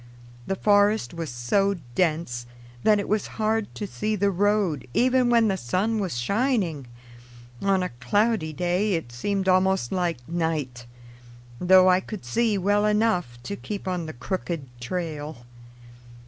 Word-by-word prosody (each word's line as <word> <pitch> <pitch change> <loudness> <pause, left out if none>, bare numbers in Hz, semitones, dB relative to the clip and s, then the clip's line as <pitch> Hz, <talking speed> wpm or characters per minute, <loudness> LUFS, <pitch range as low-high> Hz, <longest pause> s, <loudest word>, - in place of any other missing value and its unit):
The 195 - 0
forest 205 - +3
was 165 -2 -5
so 195 +12 +1 0.2
dense 155 -7 -1 0.3
that 210 - +4
it 200 - -3
was 215 0 0
hard 220 -1 0
to 210 - -4
see 215 +2 -2
the 200 0 +1
road 195 -8 +1
even 255 0 +3
when 230 -2 +4
the 195 -2 0
sun 190 - 0
was 185 -11 -2
shining; 190 - 0 0.7
on 195 -2 +2
a 180 - -2
cloudy 205 - +1
day 180 +6 0
it 160 -8 -4
seemed 190 +11 -2
almost 185 -7 +2
like 170 -9 -2
night, 155 -8 -2 0.7
though 185 +1 +6
I 185 0 +5
could 195 - -8
see 220 - +1
well 205 +2 +2
enough 210 - +1
to 200 - -4
keep 200 -1 -6
on 180 -3 -2
the 155 - -6
crooked 165 +2 -4
trail. 150 -2 -5
185 Hz, 145 wpm, -25 LUFS, 155-205 Hz, 0.7 s, though